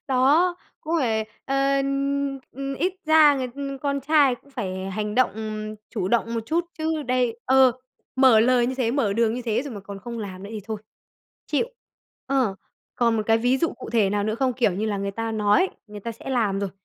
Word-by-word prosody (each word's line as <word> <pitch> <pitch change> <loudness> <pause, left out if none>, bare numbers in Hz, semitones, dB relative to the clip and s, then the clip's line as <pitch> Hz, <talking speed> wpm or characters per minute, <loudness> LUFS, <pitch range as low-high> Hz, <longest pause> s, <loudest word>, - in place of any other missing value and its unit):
Đó! 290 +8 +3 0.2
Cũng 320 +2 -3
phải, 220 -4 0 0.2
ờ, 275 0 +1 0.8
ừm, 275 0 -4
ít 365 +5 +1
ra 310 -2 +7
người 255 -2 -2 0.3
con 280 -1 0
trai 280 -2 +4
cũng 280 - -20
phải 190 -5 -4
hành 210 +2 -3
động, 255 0 +3 0.6
chủ 195 -6 -2
động 235 +1 +1
một 230 - 0
chút, 335 +5 +1
chứ 315 -1 -1
đây 250 -3 0
Ờ, 265 -1 +5 0.4
mở 260 -5 +6
lời 245 0 +4
như 260 - -2
thế, 245 -3 0
mở 240 -7 +1
đường 230 +1 +2
như 250 - -4
thế 235 +1 0
rồi 275 -6 -7
mà 200 - -7
còn 195 0 -9
không 235 +3 -7
làm 190 -3 -6
nữa 200 - -8
thì 215 - -5
thôi. 220 0 -4 0.7
Chịu! 470 - +1 0.6
Ờ, 260 -7 +1 0.4
còn 235 -2 +2
một 215 - 0
cái 225 0 +4
ví 245 +3 +2
dụ 330 - +2
cụ - - -9
thể 215 -5 +3
nào 205 0 0
nữa 215 0 0
không? 255 +1 +1
Kiểu 240 -5 +2
như 205 +5 -2
là 205 -2 -1
người 200 0 -2
ta 225 +2 -3
nói 215 - +3 0.2
người 210 -1 -9
ta 230 +3 -5
sẽ 250 +4 -8
làm 210 -6 +1
rồi, 200 -2 -2
240 Hz, 215 wpm, -24 LUFS, 215-275 Hz, 0.8 s, ra